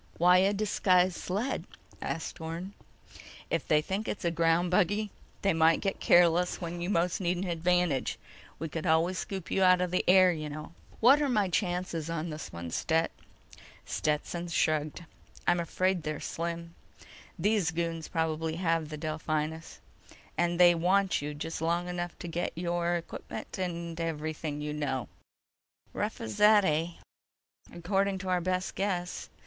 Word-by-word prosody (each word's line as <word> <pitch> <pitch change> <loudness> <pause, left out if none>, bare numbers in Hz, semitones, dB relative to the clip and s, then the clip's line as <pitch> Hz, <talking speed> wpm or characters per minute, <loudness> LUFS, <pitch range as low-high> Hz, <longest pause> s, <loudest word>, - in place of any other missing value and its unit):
"Why 180 +2 +6
a 195 +2 +4
disguised 185 -3 +2
sled?" 210 +9 -2 0.4
asked 160 - -4
Orne. 165 +4 -5 0.8
"If - - -1
they 150 0 +3
think 200 +5 -3
it's 195 - -4
a 170 - +2
ground 165 +1 +2
buggy, 205 +3 +2 0.3
they 195 -2 +3
might 160 0 +4
get 195 -2 -2
careless 175 0 +4
when 175 0 -5
you 175 - -2
most 180 0 +1
need 180 0 +1
an 180 - -2
advantage. 175 -4 +1 0.4
We 160 - -4
could 160 +3 -4
always 165 +3 +2
scoop 190 -5 -5
you 195 - +1
out 185 -1 +6
of 180 -1 -1
the 180 - +1
air, 185 0 +7
you 155 -3 -4
know." 155 +2 -8 0.3
"What're 275 +5 +6
my 210 -6 +2
chances 175 -3 -1
on 165 0 -3
this 150 0 -7
one, 85 0 -6
Stet?" 165 - +1 0.7
Stetson 155 +3 -2
shrugged. 155 0 0 0.4
"I'm 175 0 +3
afraid 185 +2 0
they're 155 -1 -3
slim. 170 0 -4 0.6
These 200 -1 +2
goons 165 -1 -3
probably 160 -1 -1
have 165 -3 0
the 155 - -6
Delphinus, 155 +1 -3 0.5
and 175 0 0
they 175 -1 +8
want 185 +2 +2
you 150 0 -4
just 160 +2 -5
long 170 +2 0
enough 175 -1 -4
to 175 - -7
get 170 +1 -2
your 175 0 0
equipment 170 +2 -6
and 170 -2 -3
everything 155 -2 -3
you 150 0 -3
know." 135 -6 -2 0.8
"Rough - - -3
as 110 -1 -5
that, 210 -1 +6
eh?" 165 +1 0 0.8
"According 195 +3 0
to 190 0 -5
our 180 -1 +2
best 185 +1 -1
guess. 180 -3 -2
170 Hz, 155 wpm, -30 LUFS, 160-185 Hz, 0.8 s, they